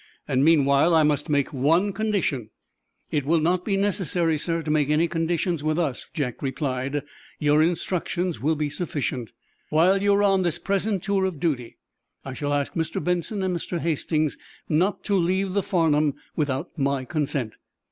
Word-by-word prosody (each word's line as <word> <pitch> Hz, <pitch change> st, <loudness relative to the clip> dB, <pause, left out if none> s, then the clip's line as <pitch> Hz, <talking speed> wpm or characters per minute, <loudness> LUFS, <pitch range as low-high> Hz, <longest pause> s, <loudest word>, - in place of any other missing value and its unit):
Meanwhile, 140 Hz, +2 st, +4 dB
I 160 Hz, -, +5 dB
must 150 Hz, +1 st, +1 dB
make 145 Hz, -1 st, +1 dB
one 165 Hz, +9 st, +2 dB
condition." 195 Hz, -, -1 dB, 0.6 s
"It 150 Hz, -2 st, 0 dB
will 160 Hz, +4 st, +2 dB
not 175 Hz, +3 st, +1 dB
be 195 Hz, 0 st, 0 dB
necessary, 180 Hz, -5 st, +1 dB
sir, 165 Hz, +2 st, -1 dB
to 155 Hz, -, -2 dB
make 150 Hz, -2 st, +2 dB
any 155 Hz, +3 st, +3 dB
conditions 165 Hz, -1 st, -1 dB
with 155 Hz, +1 st, 0 dB
us," 150 Hz, -7 st, -2 dB
Jack 135 Hz, -7 st, -3 dB
replied. 135 Hz, 0 st, -2 dB, 0.3 s
"Your 150 Hz, 0 st, +3 dB
instructions 175 Hz, +1 st, -1 dB
will 155 Hz, +4 st, +2 dB
be 150 Hz, 0 st, -1 dB
sufficient." 145 Hz, -, -3 dB, 0.4 s
"While 180 Hz, +5 st, +4 dB
you 200 Hz, 0 st, +4 dB
are 205 Hz, -, +2 dB
on 195 Hz, -2 st, +3 dB
this 175 Hz, -3 st, 0 dB
present 200 Hz, -1 st, -1 dB
tour 195 Hz, -1 st, +1 dB
of 180 Hz, -6 st, -3 dB
duty, 135 Hz, -8 st, -2 dB, 0.5 s
I 135 Hz, -, -5 dB
shall 145 Hz, +2 st, -3 dB
ask 145 Hz, -1 st, -1 dB
Mr. 160 Hz, -1 st, -2 dB
Benson 180 Hz, +4 st, -1 dB
and 185 Hz, -1 st, 0 dB
Mr. 170 Hz, +1 st, -3 dB
Hastings 155 Hz, -2 st, -1 dB, 0.3 s
not 180 Hz, +6 st, +1 dB
to 205 Hz, -, -1 dB
leave 190 Hz, +1 st, +1 dB
the 200 Hz, -, +2 dB
'Farnum' 155 Hz, -6 st, +2 dB, 0.2 s
without 145 Hz, +1 st, -2 dB
my 140 Hz, -1 st, 0 dB
consent." 140 Hz, -6 st, -2 dB
160 Hz, 165 wpm, -24 LUFS, 145-180 Hz, 0.6 s, I